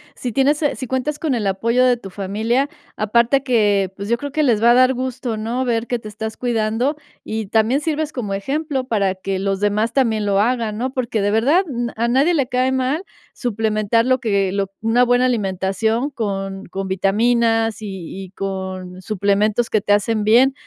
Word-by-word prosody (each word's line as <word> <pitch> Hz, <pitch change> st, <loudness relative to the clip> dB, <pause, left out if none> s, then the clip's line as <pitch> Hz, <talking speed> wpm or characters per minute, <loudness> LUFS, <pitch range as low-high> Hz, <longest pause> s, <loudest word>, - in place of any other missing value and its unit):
si 245 Hz, -, -4 dB
tienes 280 Hz, +5 st, +2 dB
eh, 295 Hz, -, +1 dB
si 260 Hz, -, -5 dB
cuentas 260 Hz, +4 st, -2 dB
con 305 Hz, -4 st, -1 dB
el 220 Hz, -5 st, -1 dB
apoyo 230 Hz, +6 st, +1 dB
de 250 Hz, -1 st, +4 dB
tu 195 Hz, -5 st, -10 dB
familia, 220 Hz, +8 st, -1 dB, 0.3 s
aparte 235 Hz, +5 st, +2 dB
que, 205 Hz, -7 st, +2 dB
pues, 200 Hz, 0 st, -5 dB
yo 235 Hz, +2 st, +1 dB
creo 285 Hz, +1 st, -5 dB
que 305 Hz, +1 st, +1 dB
les 230 Hz, -6 st, +2 dB
va 235 Hz, +1 st, +6 dB
a -, -, +6 dB
dar 255 Hz, +1 st, +5 dB
gusto, 255 Hz, -2 st, -3 dB
¿no?, 235 Hz, +4 st, -2 dB
ver 235 Hz, -1 st, 0 dB
que 245 Hz, -, -1 dB
te 225 Hz, -, -10 dB
estás 220 Hz, +1 st, -6 dB
cuidando, 240 Hz, +3 st, 0 dB, 0.3 s
y 220 Hz, -1 st, -4 dB
también 225 Hz, +7 st, +2 dB
sirves 310 Hz, -1 st, -2 dB
como 210 Hz, -6 st, -3 dB
ejemplo 275 Hz, +6 st, -2 dB
para 200 Hz, -6 st, 0 dB
que 190 Hz, 0 st, -3 dB
los 195 Hz, 0 st, -1 dB
demás 210 Hz, +3 st, +1 dB
también 220 Hz, -6 st, +1 dB
lo 200 Hz, 0 st, +2 dB
hagan, 225 Hz, -2 st, 0 dB
¿no? 255 Hz, +2 st, -2 dB
Porque, 235 Hz, -4 st, -1 dB
de 205 Hz, -, +1 dB
verdad, 280 Hz, -, +3 dB
n 240 Hz, -3 st, -3 dB
a 235 Hz, +2 st, 0 dB
nadie 275 Hz, +8 st, +3 dB
le 275 Hz, -5 st, +1 dB
cae 255 Hz, +1 st, +1 dB
mal 265 Hz, +7 st, 0 dB, 0.3 s
suplementar 220 Hz, -1 st, 0 dB
lo 255 Hz, 0 st, +2 dB
que 200 Hz, -5 st, 0 dB
lo 195 Hz, -1 st, -1 dB
una 230 Hz, +2 st, +3 dB
buena 245 Hz, +1 st, +3 dB
alimentación 220 Hz, +3 st, 0 dB
con 195 Hz, -5 st, -4 dB
con 195 Hz, +2 st, -5 dB
vitaminas 225 Hz, +3 st, +1 dB
y 190 Hz, -1 st, -7 dB
y 185 Hz, -, -14 dB
con 190 Hz, -1 st, -5 dB
suplementos 210 Hz, +3 st, 0 dB
que 215 Hz, -, +2 dB
te 205 Hz, -, -1 dB
hacen 210 Hz, +1 st, +1 dB
bien. 245 Hz, +6 st, +5 dB
225 Hz, 195 wpm, -20 LUFS, 200-255 Hz, 0.3 s, va